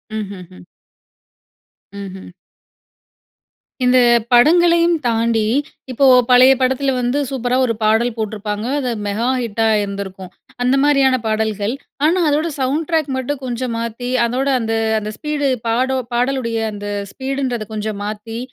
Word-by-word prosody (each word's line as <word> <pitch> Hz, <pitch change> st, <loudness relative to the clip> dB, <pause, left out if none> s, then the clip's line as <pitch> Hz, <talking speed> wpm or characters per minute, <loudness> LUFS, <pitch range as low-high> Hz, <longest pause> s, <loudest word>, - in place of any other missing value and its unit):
ம்ஹ்ஹ்ம். 185 Hz, -, -8 dB, 1.3 s
ம்ஹ்ம். 190 Hz, -1 st, -8 dB, 1.6 s
இந்த 250 Hz, +1 st, +4 dB, 0.4 s
படங்களையும் 340 Hz, +6 st, +5 dB
தாண்டி, 230 Hz, -1 st, +1 dB, 0.5 s
இப்போ 270 Hz, +3 st, +2 dB, 0.2 s
பழைய 250 Hz, +1 st, +7 dB
படத்துல 265 Hz, +1 st, +1 dB
வந்து 245 Hz, +4 st, 0 dB
சூப்பரா 250 Hz, -1 st, -1 dB
ஒரு 230 Hz, -, 0 dB
பாடல் 220 Hz, +3 st, +2 dB
போட்டுருப்பாங்க, 210 Hz, 0 st, -4 dB
அத 255 Hz, -, -2 dB, 0.2 s
மெகா 215 Hz, +4 st, -1 dB
ஹிட்டா 225 Hz, -1 st, -1 dB
இருந்திருக்கும். 195 Hz, -2 st, -6 dB, 0.3 s
அந்த 250 Hz, +2 st, +3 dB
மாதிரியான 275 Hz, -3 st, +4 dB
பாடல்கள். 215 Hz, 0 st, -1 dB, 0.3 s
ஆனா, 345 Hz, +4 st, +3 dB
அதோட 305 Hz, +3 st, +1 dB
சவுண்ட் 280 Hz, +4 st, -1 dB
டிராக் 315 Hz, -4 st, 0 dB
மட்டும் 270 Hz, +2 st, -3 dB
கொஞ்சம் 245 Hz, -1 st, -3 dB
மாத்தி 235 Hz, +2 st, -4 dB, 0.2 s
அதோட 255 Hz, +4 st, -1 dB
அந்த 225 Hz, -1 st, -2 dB, 0.3 s
அந்த 215 Hz, 0 st, -5 dB
ஸ்பீடு 300 Hz, -2 st, -1 dB, 0.2 s
பாடோ 260 Hz, +3 st, +1 dB, 0.2 s
பாடலுடைய 245 Hz, -1 st, 0 dB
அந்த 205 Hz, 0 st, -7 dB, 0.2 s
ஸ்பீடு 270 Hz, +1 st, -3 dB
ன்றத 230 Hz, -4 st, -4 dB
கொஞ்சம் 210 Hz, -1 st, -4 dB
மாத்தி, 215 Hz, +2 st, -6 dB
240 Hz, 125 wpm, -18 LUFS, 215-265 Hz, 1.6 s, பழைய